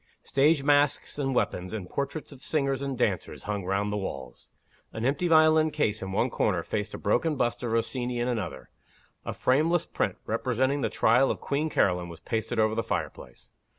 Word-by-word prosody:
Stage 145 Hz, +1 st, +3 dB
masks 145 Hz, 0 st, +2 dB
and 135 Hz, -2 st, -1 dB
weapons, 90 Hz, -5 st, -1 dB
and 100 Hz, -5 st, -5 dB
portraits 140 Hz, -, -4 dB
of 135 Hz, -2 st, -13 dB
singers 135 Hz, -2 st, 0 dB
and 135 Hz, -2 st, -3 dB
dancers, 100 Hz, -8 st, -1 dB
hung 105 Hz, -2 st, -3 dB
round 100 Hz, +2 st, 0 dB
the -, -, -1 dB
walls. 95 Hz, -10 st, -7 dB, 0.4 s
An 110 Hz, -, -4 dB
empty 140 Hz, +7 st, +1 dB
violin 155 Hz, -1 st, +5 dB
case 110 Hz, -9 st, -1 dB
in 95 Hz, 0 st, -5 dB
one -, -, +1 dB
corner -, -, 0 dB
faced 105 Hz, 0 st, -3 dB
a -, -, -5 dB
broken 135 Hz, +10 st, +1 dB
bust 120 Hz, -5 st, -1 dB
of 120 Hz, -2 st, -3 dB
Rossini 120 Hz, +2 st, -1 dB
in 120 Hz, +1 st, 0 dB
another. 120 Hz, -4 st, -4 dB, 0.5 s
A -, -, -2 dB
frameless 155 Hz, +6 st, +2 dB
print, 100 Hz, -3 st, -2 dB
representing 130 Hz, +5 st, 0 dB
the -, -, 0 dB
Trial 120 Hz, +4 st, +3 dB
of -, -, -2 dB
Queen 150 Hz, +3 st, -1 dB
Caroline, 90 Hz, -, +1 dB
was 85 Hz, -1 st, -10 dB
pasted 115 Hz, +6 st, -3 dB
over 110 Hz, 0 st, +3 dB
the 115 Hz, -, 0 dB
fireplace. 110 Hz, -, -5 dB
125 Hz, 185 wpm, -27 LUFS, 105-140 Hz, 0.5 s, violin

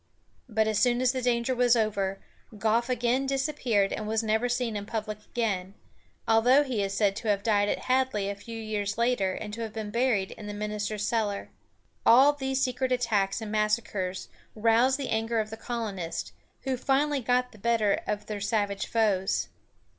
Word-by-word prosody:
But 220 Hz, -1 st, +1 dB
as 215 Hz, -1 st, +1 dB
soon 240 Hz, +2 st, +3 dB
as 255 Hz, -1 st, +3 dB
the 260 Hz, -1 st, -3 dB
danger 240 Hz, 0 st, +1 dB
was 245 Hz, -1 st, +4 dB
over, 200 Hz, -4 st, 0 dB, 0.4 s
Goffe 225 Hz, +4 st, +1 dB
again 250 Hz, +2 st, +1 dB
disappeared, 265 Hz, -7 st, 0 dB
and 215 Hz, -, -4 dB
was 220 Hz, +1 st, 0 dB
never 220 Hz, +3 st, +1 dB
seen 245 Hz, -2 st, -1 dB
in 205 Hz, 0 st, -4 dB
public 215 Hz, -1 st, -4 dB
again, 200 Hz, -5 st, -2 dB, 0.5 s
although 245 Hz, +6 st, +5 dB
he 250 Hz, -7 st, -2 dB
is 195 Hz, 0 st, -2 dB
said 200 Hz, -2 st, +2 dB
to 225 Hz, -, -5 dB
have 200 Hz, -1 st, +1 dB
died 205 Hz, -2 st, +2 dB
at -, -, -1 dB
Hadley 255 Hz, -6 st, +1 dB
a 200 Hz, -, -1 dB
few 225 Hz, +3 st, -8 dB
years 210 Hz, -2 st, -3 dB
later, 235 Hz, -6 st, +1 dB
and 210 Hz, +1 st, -6 dB
to 230 Hz, -, -5 dB
have 220 Hz, -2 st, -5 dB
been 215 Hz, -2 st, -5 dB
buried 235 Hz, -5 st, +1 dB
in 210 Hz, -, -9 dB
the 205 Hz, -, -5 dB
minister's 210 Hz, 0 st, -3 dB
cellar. 210 Hz, -3 st, -1 dB, 0.5 s
All 270 Hz, +5 st, +7 dB
these 265 Hz, -2 st, -2 dB
secret 255 Hz, 0 st, -1 dB
attacks 225 Hz, -5 st, +1 dB
and 215 Hz, -1 st, -5 dB
massacres 210 Hz, -3 st, -1 dB, 0.3 s
roused 230 Hz, +4 st, +3 dB
the 275 Hz, -2 st, -4 dB
anger 225 Hz, +1 st, 0 dB
of 215 Hz, 0 st, -2 dB
the -, -, -4 dB
colonists, 215 Hz, -8 st, -4 dB, 0.3 s
who 265 Hz, -1 st, -2 dB
finally 280 Hz, +3 st, +1 dB
got 250 Hz, +1 st, +1 dB
the 215 Hz, -, -16 dB
better 220 Hz, -1 st, +2 dB
of 210 Hz, 0 st, -2 dB
their 210 Hz, -2 st, -5 dB
savage 205 Hz, -1 st, -1 dB
foes. 210 Hz, -4 st, +1 dB
220 Hz, 185 wpm, -28 LUFS, 205-245 Hz, 0.5 s, All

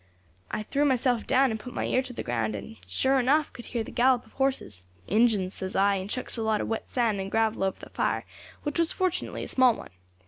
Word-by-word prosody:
"I 215 Hz, -, -3 dB
threw 280 Hz, +6 st, 0 dB
myself 255 Hz, -4 st, +2 dB
down 265 Hz, -1 st, +4 dB
and 220 Hz, -, -3 dB
put 245 Hz, +2 st, -9 dB
my -, -, -1 dB
ear 255 Hz, -, +2 dB
to 260 Hz, -, -8 dB
the 245 Hz, -, -5 dB
ground, 115 Hz, -3 st, -1 dB
and, 105 Hz, +2 st, -8 dB
sure 265 Hz, -, +2 dB
enough, 285 Hz, +4 st, +2 dB
could 240 Hz, -, -10 dB
hear 235 Hz, -2 st, -2 dB
the -, -, -9 dB
gallop 250 Hz, 0 st, +3 dB
of 220 Hz, -, -21 dB
horses. 265 Hz, -, -1 dB, 0.2 s
'Injins,' 210 Hz, -3 st, +2 dB
says 185 Hz, -1 st, -5 dB
I, 200 Hz, +1 st, +4 dB
and 190 Hz, +1 st, -5 dB
chucks 255 Hz, +2 st, -2 dB
a -, -, -2 dB
lot 220 Hz, -1 st, +1 dB
of -, -, -2 dB
wet 225 Hz, -, -3 dB
sand 230 Hz, -5 st, +1 dB
and 190 Hz, -, -4 dB
gravel 220 Hz, -1 st, +1 dB
over 190 Hz, -1 st, -1 dB
the -, -, -11 dB
fire, -, -, 0 dB, 0.4 s
which 295 Hz, +2 st, -2 dB
was 335 Hz, -1 st, +3 dB
fortunately 370 Hz, -1 st, -1 dB
a -, -, -5 dB
small 255 Hz, -3 st, +4 dB
one. -, -, -10 dB
230 Hz, 240 wpm, -27 LUFS, 200-260 Hz, 0.4 s, down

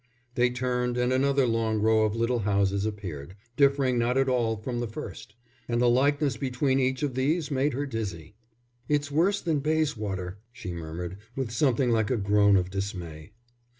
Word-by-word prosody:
They 125 Hz, 0 st, +3 dB
turned, 125 Hz, 0 st, -1 dB
and 125 Hz, +1 st, +1 dB
another 140 Hz, +1 st, +3 dB
long 115 Hz, -2 st, 0 dB
row 110 Hz, 0 st, +3 dB
of 105 Hz, 0 st, -1 dB
little 115 Hz, +1 st, 0 dB
houses 100 Hz, -1 st, +1 dB
appeared, 90 Hz, -6 st, -6 dB, 0.2 s
differing 140 Hz, -3 st, +3 dB
not 120 Hz, +2 st, +1 dB
at 135 Hz, 0 st, +3 dB
all 120 Hz, -3 st, +1 dB
from 120 Hz, +3 st, -4 dB
the 120 Hz, -, -2 dB
first; 110 Hz, -1 st, -8 dB, 0.3 s
and 120 Hz, 0 st, 0 dB
the 120 Hz, -, +4 dB
likeness 140 Hz, +1 st, +2 dB
between 130 Hz, +1 st, 0 dB
each 130 Hz, +1 st, 0 dB
of 140 Hz, -3 st, -1 dB
these 150 Hz, +5 st, 0 dB
made 140 Hz, +1 st, +1 dB
her 140 Hz, +3 st, -2 dB
dizzy. 105 Hz, -, -5 dB, 0.6 s
"It's 145 Hz, -1 st, 0 dB
worse 185 Hz, +7 st, +2 dB
than 160 Hz, -4 st, 0 dB
Bayswater," 105 Hz, -, -1 dB
she 95 Hz, -6 st, -7 dB
murmured, 85 Hz, +2 st, -6 dB, 0.2 s
with 130 Hz, -4 st, -3 dB
something 125 Hz, 0 st, +2 dB
like 110 Hz, -2 st, +1 dB
a 125 Hz, -, +1 dB
groan 100 Hz, 0 st, +4 dB
of 90 Hz, 0 st, -1 dB
dismay. 95 Hz, -3 st, -5 dB
120 Hz, 175 wpm, -27 LUFS, 105-135 Hz, 0.6 s, the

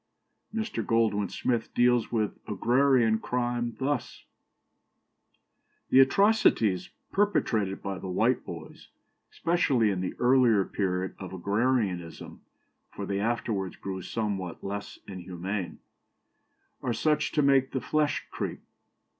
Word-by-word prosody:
" -, -, -50 dB
Mr. 225 Hz, 0 st, -2 dB
Goldwin 110 Hz, -4 st, +1 dB
Smith 120 Hz, -3 st, -1 dB
deals 120 Hz, -1 st, +3 dB
with 110 Hz, -3 st, -1 dB
agrarian 120 Hz, +1 st, +3 dB
crime 120 Hz, -1 st, -2 dB
thus: 135 Hz, -2 st, -3 dB, 1.7 s
"The 130 Hz, -, +7 dB
atrocities 135 Hz, -, +4 dB, 0.2 s
perpetrated 115 Hz, -, +1 dB
by 100 Hz, -1 st, -4 dB
the -, -, -7 dB
Whiteboys, 90 Hz, -, -2 dB, 0.4 s
especially 135 Hz, -, +2 dB
in 95 Hz, -2 st, -2 dB
the 95 Hz, -, -3 dB
earlier 120 Hz, -5 st, +4 dB
period 95 Hz, -1 st, -2 dB
of 95 Hz, -1 st, -7 dB
agrarianism 100 Hz, -3 st, -1 dB, 0.5 s
(for -, -, -6 dB
they 100 Hz, 0 st, -2 dB
afterwards 105 Hz, -4 st, -1 dB
grew 95 Hz, -1 st, -5 dB
somewhat 95 Hz, -4 st, -3 dB
less 100 Hz, +1 st, -5 dB
inhuman), 95 Hz, 0 st, -5 dB, 1.0 s
are 120 Hz, -, -1 dB
such 150 Hz, +7 st, +1 dB
as -, -, -7 dB
to 150 Hz, -, +2 dB
make 135 Hz, -1 st, +4 dB
the 130 Hz, -, -2 dB
flesh 150 Hz, +2 st, 0 dB
creep. -, -, -4 dB
115 Hz, 115 wpm, -28 LUFS, 95-130 Hz, 1.7 s, The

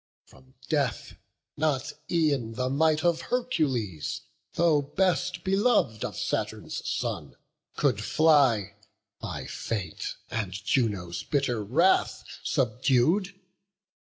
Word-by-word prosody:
From 130 Hz, 0 st, -21 dB
death 145 Hz, -5 st, -1 dB, 0.4 s
not 145 Hz, -3 st, 0 dB, 0.2 s
e'en 145 Hz, -9 st, +1 dB
the 130 Hz, +2 st, -1 dB
might 155 Hz, +2 st, +2 dB
of 170 Hz, -1 st, +2 dB
Hercules, 135 Hz, -, -1 dB, 0.3 s
Though 160 Hz, -3 st, +3 dB
best 180 Hz, +3 st, 0 dB
belov'd 195 Hz, -, +2 dB
of -, -, -4 dB
Saturn's -, -, -2 dB
son, -, -, -3 dB, 0.4 s
could -, -, +1 dB
fly, 130 Hz, -11 st, +3 dB, 0.4 s
By -, -, -5 dB
fate 95 Hz, -8 st, -4 dB, 0.2 s
and 100 Hz, -5 st, -2 dB
Juno's 100 Hz, -4 st, -1 dB
bitter 130 Hz, -6 st, 0 dB
wrath 165 Hz, -, +2 dB, 0.2 s
subdued. 135 Hz, -, +1 dB
140 Hz, 100 wpm, -27 LUFS, 110-165 Hz, 0.4 s, Though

